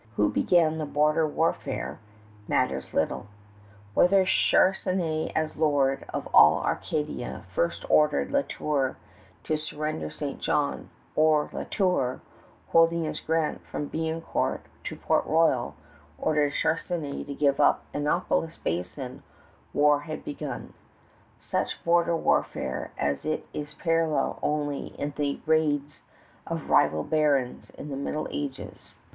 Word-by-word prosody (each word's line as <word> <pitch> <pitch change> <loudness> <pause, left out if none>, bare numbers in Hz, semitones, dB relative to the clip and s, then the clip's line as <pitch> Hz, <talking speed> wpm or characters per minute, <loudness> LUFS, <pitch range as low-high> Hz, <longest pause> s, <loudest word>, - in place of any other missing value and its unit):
Who 105 -1 +2
began 160 -3 +3
the 155 - -2
border 150 +2 +2
warfare 160 +2 -2 0.5
matters 65 0 0
little. - - -1 0.7
Whether 190 - +5
Charnisay 185 -4 +2
as 155 0 -1
lord 145 -3 +2
of - - -4
all - - +7
Acadia 150 -8 -3
first 85 -1 -1
ordered 150 - +3
La 280 0 +3
Tour 145 - -1 0.5
to 155 - 0
surrender 150 - -4
St. 140 - -5
John, 145 -1 0 0.3
or 155 -1 +3
La - - -4
Tour, 180 -11 +1 0.5
holding 165 0 +4
his 155 - -3
grant 160 -1 -1
from 145 - -4
Biencourt 160 0 -1 0.2
to - - -4
Port - - +1
Royal, 145 - +2 0.4
ordered 150 -2 +1
Charnisay 160 -3 -1
to 140 - -5
give 140 -1 +2
up 145 - +4
Annapolis 160 +2 0
Basin, 90 - -4 0.5
war 145 0 +4
had 155 +1 -7
begun, 145 - -6 0.7
such - - -2
border 170 0 +3
warfare 65 - 0
as 70 0 0
has 155 0 -2
its 150 0 -6
parallel 165 -2 +1
only 145 -1 -2
in 145 0 -2
the 145 -1 -1
raids 150 -2 +1 0.5
of - - -4
rival 80 0 +4
barons 145 -5 +1
in 150 - -9
the 140 - -4
Middle 150 +2 -3
Ages. 140 -2 -6
150 Hz, 125 wpm, -27 LUFS, 140-160 Hz, 0.7 s, all